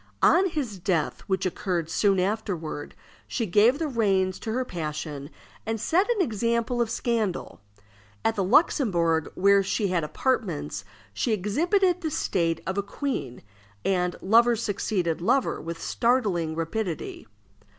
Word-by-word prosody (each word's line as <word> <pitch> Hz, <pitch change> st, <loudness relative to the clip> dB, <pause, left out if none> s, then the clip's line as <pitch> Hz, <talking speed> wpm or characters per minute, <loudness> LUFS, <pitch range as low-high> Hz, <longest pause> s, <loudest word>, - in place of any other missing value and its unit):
On 370 Hz, +3 st, +5 dB
his 255 Hz, -, -4 dB
death, 170 Hz, -4 st, -1 dB
which 190 Hz, -1 st, 0 dB
occurred 175 Hz, -2 st, -1 dB
soon 195 Hz, 0 st, +3 dB
afterward, 180 Hz, -7 st, -3 dB, 0.3 s
she 235 Hz, -, -2 dB
gave 215 Hz, +7 st, +4 dB
the 320 Hz, 0 st, -1 dB
reins 195 Hz, -7 st, +1 dB
to 220 Hz, -, -4 dB
her 255 Hz, +3 st, -1 dB
passion, 150 Hz, -, -5 dB, 0.3 s
and 225 Hz, 0 st, -2 dB
set 365 Hz, -, +2 dB
an 440 Hz, -6 st, +2 dB
example 235 Hz, -, 0 dB
of 235 Hz, -, 0 dB
scandal. 225 Hz, -, -2 dB, 0.6 s
At 225 Hz, -, +3 dB
the 200 Hz, -, 0 dB
Luxembourg, 180 Hz, -, +2 dB
where 200 Hz, +1 st, +5 dB
she 200 Hz, +1 st, -1 dB
had 175 Hz, -3 st, 0 dB
apartments, 150 Hz, -, -1 dB, 0.3 s
she 220 Hz, -, 0 dB
exhibited 350 Hz, -, +1 dB
the 320 Hz, -, -1 dB
state 170 Hz, -, 0 dB
of 190 Hz, +1 st, -1 dB
a -, -, +2 dB
queen, 200 Hz, -, -4 dB, 0.4 s
and 180 Hz, -2 st, +1 dB
lover 235 Hz, +4 st, +5 dB
succeeded 195 Hz, -6 st, -1 dB
lover 255 Hz, +8 st, +1 dB
with 165 Hz, +1 st, -6 dB
startling 200 Hz, -10 st, +1 dB
rapidity. 165 Hz, +1 st, -4 dB
200 Hz, 140 wpm, -26 LUFS, 170-240 Hz, 0.6 s, On